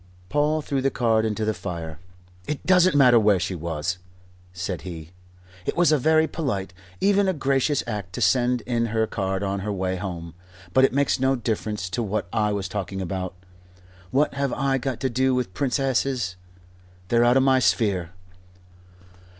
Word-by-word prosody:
Paul 150 +3 +1
threw 140 -2 -1
the 135 - +2
card 115 -4 +1
into 110 0 -1
the 110 - +1
fire. 85 -6 -6 0.5
"It 150 - -4
doesn't 180 -2 +5
matter 125 -4 +6
where 105 -3 +4
she 95 +1 -2
was," 85 +1 -3 0.5
said 90 0 -4
he. 85 -3 -8 0.5
"It - - -3
was 175 -2 +4
a 155 - +3
very 160 +3 +3
polite 100 - -3 0.3
even 200 0 +3
a 190 - +2
gracious 140 -1 +1
act 105 -6 -5
to - - -4
send 125 -1 +2
in 115 -1 -1
her 110 0 +1
card 95 -2 -2
on 100 0 -1
her 105 +2 -3
way 95 -1 -2
home. 85 -3 -6 0.4
But 130 +4 +6
it - - +1
makes 140 0 +1
no 135 +1 +2
difference 110 -5 -3
to 120 - -1
what 105 -3 -2
I 105 -1 +1
was 100 -2 -2
talking 95 -1 -4
about. 95 0 -4 0.7
What 140 +7 +1
have 140 -1 -1
I 135 0 0
got 130 -1 -3
to 130 - +1
do 130 +2 +2
with 125 -7 -2
princesses? 130 -6 0 0.7
They're 120 0 +4
out 120 +2 +5
of 135 - +4
my 135 -1 +4
sphere. 100 -8 +1
115 Hz, 175 wpm, -24 LUFS, 95-135 Hz, 0.7 s, matter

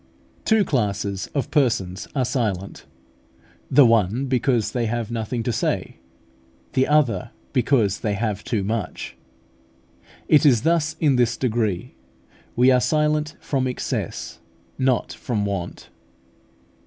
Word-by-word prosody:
Two 220 -3 +3
classes 100 -6 -1
of 140 - -1
persons 110 - 0
are 130 -2 +1
silent: 105 -7 -3 0.8
the 145 - +7
one 115 +2 +2
because 125 -4 +1
they 120 -2 -1
have 120 0 -3
nothing 115 +1 -3
to 120 - -1
say, - - -2 0.8
the 130 - +2
other 135 -5 +2 0.2
because 120 -6 +2
they 105 -2 -1
have 105 -1 -2
too 110 -5 -1
much. 110 +2 -4 1.1
It 150 - +5
is 125 -7 +4
thus 160 -1 +1
in 145 -5 +3
this 120 -1 +2
degree. 115 -2 -1 0.6
We 125 +2 +5
are 125 -1 +4
silent 150 0 +1
from 130 -2 -1
excess, 125 - -4 0.4
not 130 -2 +1
from 105 -4 -2
want. 95 -3 -5
120 Hz, 125 wpm, -23 LUFS, 105-135 Hz, 1.1 s, the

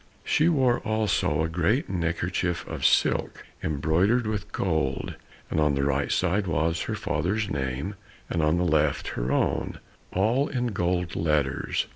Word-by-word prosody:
She 155 +3 +3
wore 130 -7 +3
also 105 -8 +1
a - - +1
great 90 - +1
neck 85 -2 -1
kerchief 90 -1 -2
of - - -5
silk - - +1 0.2
embroidered 85 - +2
with 105 -1 -3
gold, 80 -7 -1 0.4
and - - +1
on 75 -2 +3
the 70 - 0
right 70 0 0
side 95 +2 +1
was 80 0 0
her - - -2
father's 100 +8 -1
name, 70 +6 -2 0.3
and 85 - -1
on 75 +2 +2
the 90 - +1
left 75 -3 +1
her - - -2
own, - - 0 0.3
all 115 +9 +2
in 120 -4 -2
golden 90 -2 -1
letters. 75 -4 0
85 Hz, 155 wpm, -26 LUFS, 75-105 Hz, 0.4 s, She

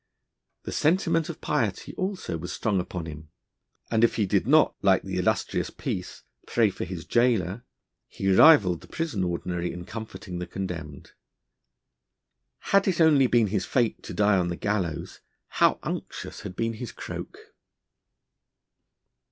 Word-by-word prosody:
The - - -5
sentiment 165 0 +1
of 170 - -7
piety 110 -10 -1
also 185 - -3
was 80 +2 -5
strong 105 -4 0
upon 90 -2 -4
him, 80 -1 -9 0.6
and 110 0 +2
if 115 - +4
he 105 - +1
did 95 - +1
not, - - +5
like - - +3
the - - -3
illustrious - - 0
Peace, - - -5 0.2
pray 110 -4 +3
for - - -5
his 90 -3 -7
jailer, 120 -4 +1 0.4
he 95 0 -1
rivalled 100 - +6
the - - -14
Prison 160 - -2
Ordinary 90 0 -2
in 90 0 -8
comforting 105 -4 -7
the 90 - -5
condemned. 85 -6 -6 1.6
Had 195 0 +5
it 185 -3 +1
only 150 -5 +5
been 120 -2 +4
his 95 -4 0
fate 120 -4 +1
to - - -8
die 105 -1 +4
on 90 - 0
the 85 - -2
gallows, 90 -6 -3 0.3
how - - +3
unctuous - - -5
had 90 - -7
been 115 +2 -1
his 115 +1 -6
croak! - - -7
100 Hz, 150 wpm, -26 LUFS, 90-120 Hz, 1.6 s, rivalled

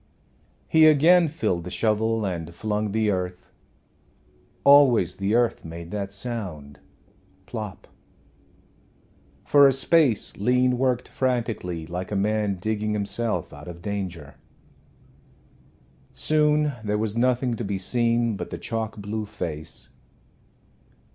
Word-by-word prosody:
He 160 -1 +6
again 165 +4 +5
filled 120 - -2
the 90 - -7
shovel 110 +3 0
and 85 -3 -4
flung 105 +2 -2
the 110 0 +1
earth. 90 -1 -4 1.1
Always 130 -11 +5
the 100 +3 0
earth 120 -1 +1
made 85 +1 -9
that 100 -1 -4
sound 100 - -6 0.7
plop! 105 -2 -7 1.6
For 140 -1 +6
a - - +4
space 135 -3 +2
Lean 125 +3 +2
worked 125 -2 0
frantically, 115 -10 -2
like 90 +4 -6
a - - -1
man 105 0 0
digging 105 +3 -2
himself 100 -2 -2
out 75 +2 -11
of 85 -1 -9
danger. 90 -7 -5 1.8
Soon 150 -1 +2
there 105 0 -1
was 110 0 -2
nothing 125 +1 +1
to 120 - -5
be 100 -1 -2
seen 115 +2 +1
but - - -6
the - - -5
chalk 110 -2 -4
blue 105 +1 -4
face. 85 -7 -6
105 Hz, 120 wpm, -24 LUFS, 95-120 Hz, 1.8 s, He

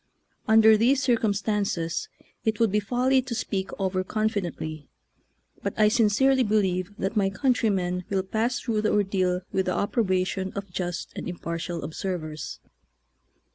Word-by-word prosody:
Under 220 0 +7
these 260 +5 +3
circumstances 210 -8 0 0.3
it 220 -1 0
would 225 -3 +3
be 210 - +3
folly 250 +5 +2
to 250 -2 -5
speak 195 -4 -2
over 185 -1 0
confi 215 +1 -1
dently, 155 -3 -6 0.7
but - - -3
I 215 -1 +5
sincerely 240 +4 +3
believe 195 -5 +1
that 195 +4 -2
my 200 -2 +3
countrymen 195 -6 0
will 195 -1 0
pass 225 +5 -1
through 220 -2 -1
the 215 - +1
ordeal 185 -3 +1
with 190 -1 0
the 185 - 0
approbation 190 -3 0
of 200 -2 -6
just 175 -1 -4
and - - -5
impartial 170 -1 -4
observers. 155 -1 -5
200 Hz, 140 wpm, -26 LUFS, 185-220 Hz, 0.7 s, Under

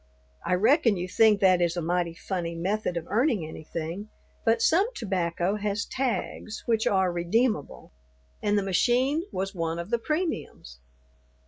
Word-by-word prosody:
I 180 - +1
reckon 220 - +3
you 180 +1 -3
think 215 +1 +4
that 185 -2 +5
is 170 0 +1
a - - 0
mighty 170 0 -1
funny 170 -2 -4
method 185 +1 -1
of 165 - -4
earning 230 - +1
anything, 165 +5 -6 0.3
but 225 0 +3
some 375 +6 +3
tobacco 185 -2 -1
has 210 +1 -2
tags 245 -4 -3
which 225 -2 +1
are 190 -2 +2
redeemable, 175 - -1 0.5
and 205 0 +1
the 200 - +1
machine 250 - +2
was 195 +1 -3
one 165 -2 -2
of 170 +5 -6
the 235 - +2
premiums. 305 - -3
195 Hz, 150 wpm, -27 LUFS, 175-225 Hz, 0.5 s, that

